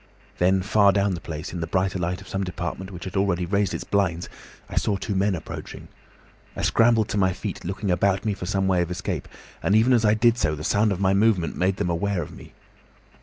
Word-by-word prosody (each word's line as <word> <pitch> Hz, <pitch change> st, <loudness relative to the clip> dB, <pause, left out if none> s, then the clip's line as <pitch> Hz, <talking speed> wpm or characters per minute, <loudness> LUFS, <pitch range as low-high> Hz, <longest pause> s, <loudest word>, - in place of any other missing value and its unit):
"Then 95 Hz, +1 st, +3 dB
far 100 Hz, 0 st, +4 dB
down 100 Hz, 0 st, +1 dB
the 85 Hz, -, -5 dB
place, 80 Hz, +2 st, -6 dB
in 90 Hz, -, -4 dB
the 80 Hz, -, -2 dB
brighter 95 Hz, 0 st, 0 dB
light 90 Hz, +1 st, -2 dB
of -, -, -13 dB
some 95 Hz, 0 st, -2 dB
department 90 Hz, +1 st, -5 dB
which 90 Hz, -3 st, -9 dB
had 95 Hz, 0 st, -7 dB
already 95 Hz, -3 st, +1 dB
raised 100 Hz, +1 st, +1 dB
its -, -, -4 dB
blinds, 90 Hz, -4 st, 0 dB, 0.4 s
I -, -, -8 dB
saw 100 Hz, -, +1 dB
two 100 Hz, -, -3 dB
men 95 Hz, 0 st, +1 dB
approaching. 80 Hz, -, -8 dB, 0.7 s
I -, -, -4 dB
scrambled 115 Hz, -2 st, +3 dB
to 105 Hz, -, 0 dB
my 95 Hz, -1 st, +3 dB
feet, -, -, -6 dB
looking 95 Hz, +2 st, -2 dB
about 95 Hz, +3 st, +1 dB
me 105 Hz, -, +1 dB
for 90 Hz, -3 st, -6 dB
some 95 Hz, +1 st, 0 dB
way 90 Hz, -2 st, +3 dB
of 85 Hz, -, -2 dB
escape, 90 Hz, -, -4 dB, 0.3 s
and 100 Hz, -, +2 dB
even 115 Hz, +4 st, +5 dB
as 120 Hz, -2 st, +3 dB
I 105 Hz, 0 st, +4 dB
did 120 Hz, +1 st, +3 dB
so 75 Hz, -6 st, +1 dB
the 75 Hz, -, -7 dB
sound 105 Hz, +5 st, +2 dB
of 95 Hz, -, -2 dB
my 95 Hz, 0 st, +3 dB
movement 100 Hz, -5 st, +2 dB
made 95 Hz, +1 st, +1 dB
them 90 Hz, -, -1 dB
aware 90 Hz, +1 st, -1 dB
of -, -, -10 dB
me. -, -, -13 dB
95 Hz, 235 wpm, -24 LUFS, 90-100 Hz, 0.7 s, even